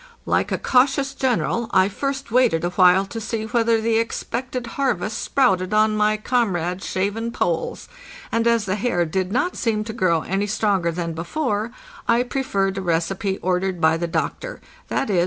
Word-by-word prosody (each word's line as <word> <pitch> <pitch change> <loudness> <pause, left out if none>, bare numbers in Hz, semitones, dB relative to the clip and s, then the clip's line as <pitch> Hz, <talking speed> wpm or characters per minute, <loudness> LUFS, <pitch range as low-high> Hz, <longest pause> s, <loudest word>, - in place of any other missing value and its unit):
Like - - +1
a - - +1
cautious 270 +1 +2
general, 230 - 0
I 185 0 +4
first 275 +4 -4
waited 235 -10 +3
a 175 - 0
while 185 +1 +5
to 225 +3 -6
see 220 0 -3
whether 230 0 +2
the 225 0 +2
expected 250 +2 -3
harvest 230 -5 -1
sprouted 205 -7 +1
on 215 0 +3
my 215 0 +2
comrades' 195 -6 -1
shaven 205 +5 -1
polls; 170 -7 -2 0.4
and 230 +1 +1
as 230 -2 +2
the 190 +1 -1
hair 195 -6 +1
did 185 +3 -2
not 255 - 0
seem 220 -3 0
to 220 +1 -6
grow 185 -7 +2
any 195 +2 -1
stronger 195 -4 +1
than 170 0 -3
before, 210 - -2 0.4
I 235 +1 +3
preferred 200 -7 -1
a - - -4
recipe 185 +3 -1
ordered 185 0 0
by 160 0 +4
the 170 +1 -2
doctor—viz. 240 - -3
210 Hz, 165 wpm, -22 LUFS, 185-235 Hz, 0.4 s, while